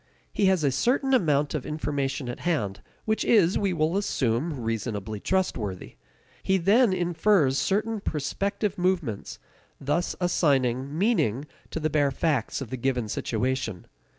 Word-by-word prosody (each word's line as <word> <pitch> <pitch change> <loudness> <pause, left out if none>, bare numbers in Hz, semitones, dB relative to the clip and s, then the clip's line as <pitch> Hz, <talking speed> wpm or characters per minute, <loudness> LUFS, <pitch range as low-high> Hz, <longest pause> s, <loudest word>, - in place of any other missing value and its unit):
He 200 - +2
has 190 -4 +2
a 140 - +3
certain 260 - +1
amount 150 - +2
of 150 -5 -2
information 145 -3 -2
at 120 - -5
hand 105 - -1 0.2
which 220 0 0
is, 195 -6 +4
we 200 -2 +1
will 165 0 0
assume, 140 - 0
reasonably 110 -2 -3
trustworthy. 110 - -2 0.5
He 190 - +2
then 205 +6 +4
infers 175 -5 +2
certain 215 +3 0
prospective 195 +5 -2
movements, 175 - -1 0.4
thus 150 +6 -1
assigning 140 -6 +1
meaning 160 - +1 0.2
to - - -4
the 155 -1 -1
bare 145 -2 +3
facts 140 -3 -1
of 125 - -6
the 130 - -3
given 125 -3 -1
situation. 115 -3 -2
150 Hz, 140 wpm, -26 LUFS, 130-190 Hz, 0.5 s, is